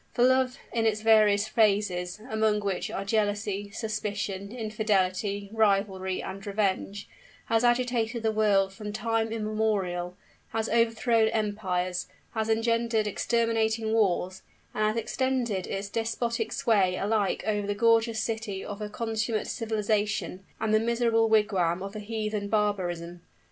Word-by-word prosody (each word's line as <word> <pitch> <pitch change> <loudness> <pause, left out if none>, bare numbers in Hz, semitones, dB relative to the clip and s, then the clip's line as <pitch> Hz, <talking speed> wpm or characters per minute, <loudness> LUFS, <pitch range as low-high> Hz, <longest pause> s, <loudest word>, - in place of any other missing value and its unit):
For 240 - +2
Love, 260 +1 +3 0.2
in 225 -1 +2
its 215 -1 0
various 215 -2 +4
phases, 200 -4 +1
among 220 -3 +1
which 200 -2 -2
are 195 - -4
Jealousy, 205 -1 -1
Suspicion, 205 -2 -4
Infidelity, 205 -3 -1
Rivalry, 195 -3 +1
and 195 +1 -7
Revenge, 200 0 -1 0.4
has 225 +1 +1
agitated 240 -1 +1
the 220 - +2
world 200 -3 +2
from 210 0 -7
time 225 +1 -1
immemorial 210 -5 -1 0.4
has 225 0 0
overthrown 230 0 +2
empires, 190 -5 -1 0.2
has 220 -1 -2
engendered 230 0 +1
exterminating 225 0 0
wars, 190 -3 +1 0.3
and 215 - +1
has 215 +2 -1
extended 240 -4 -1
its 195 +1 -3
despotic 225 +1 -2
sway 205 -9 +2
alike 205 +1 0
over 210 -2 0
the 205 - -1
gorgeous 230 0 +3
city 220 -4 -3
of 205 0 -7
a 210 - -4
consummate 220 -1 -2
civilization, 210 -4 -1 0.2
and 220 -1 0
the 215 - +5
miserable 230 0 +2
wigwam 195 -5 +2
of 200 +2 -7
a - - -4
heathen 215 -1 -3
barbarism! 175 -5 -1
215 Hz, 135 wpm, -28 LUFS, 200-225 Hz, 0.4 s, the